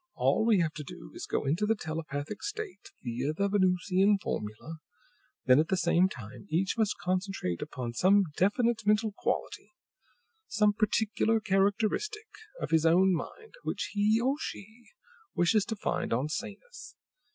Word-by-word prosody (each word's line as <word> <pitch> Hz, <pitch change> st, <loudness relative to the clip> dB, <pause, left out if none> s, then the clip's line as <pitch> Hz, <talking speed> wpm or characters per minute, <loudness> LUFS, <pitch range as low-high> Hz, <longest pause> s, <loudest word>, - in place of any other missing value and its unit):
All 220 Hz, -, +2 dB
we 220 Hz, -3 st, +5 dB
have 160 Hz, -2 st, -1 dB
to 150 Hz, -, -6 dB
do -, -, -11 dB
is -, -, -7 dB
to -, -, -18 dB
go -, -, -3 dB
into 170 Hz, +10 st, +1 dB
the 225 Hz, -, +3 dB
telepathic 155 Hz, 0 st, -5 dB
state, 410 Hz, -2 st, -6 dB
via 125 Hz, +5 st, -2 dB
the 200 Hz, +5 st, 0 dB
Venusian 190 Hz, +1 st, +3 dB
formula; 150 Hz, -, -5 dB, 0.7 s
then, 130 Hz, +2 st, +6 dB
at 160 Hz, -, +2 dB
the 190 Hz, -, +1 dB
same 175 Hz, +2 st, +3 dB
time, 120 Hz, -, -10 dB
each 175 Hz, +4 st, 0 dB
must 220 Hz, -3 st, 0 dB
concentrate 180 Hz, -, -2 dB
upon 125 Hz, -5 st, -5 dB
some 195 Hz, +9 st, +4 dB
definite 230 Hz, +4 st, +2 dB
mental 210 Hz, +1 st, +2 dB
quality, -, -, -3 dB, 0.7 s
some 210 Hz, -1 st, +2 dB
particular 220 Hz, +1 st, +1 dB
characteristic 215 Hz, -, 0 dB, 0.3 s
of -, -, -4 dB
his 160 Hz, -1 st, +4 dB
own 180 Hz, +3 st, +5 dB
mind, 440 Hz, -, -6 dB
which -, -, -3 dB
he 210 Hz, +2 st, +3 dB
or 265 Hz, +4 st, +1 dB
she 225 Hz, -3 st, -8 dB, 0.5 s
wishes 195 Hz, +4 st, +3 dB
to 225 Hz, -, -3 dB
find 210 Hz, -, -2 dB
on 130 Hz, +6 st, 0 dB
Sanus. 485 Hz, -, -7 dB
195 Hz, 155 wpm, -29 LUFS, 160-220 Hz, 0.7 s, then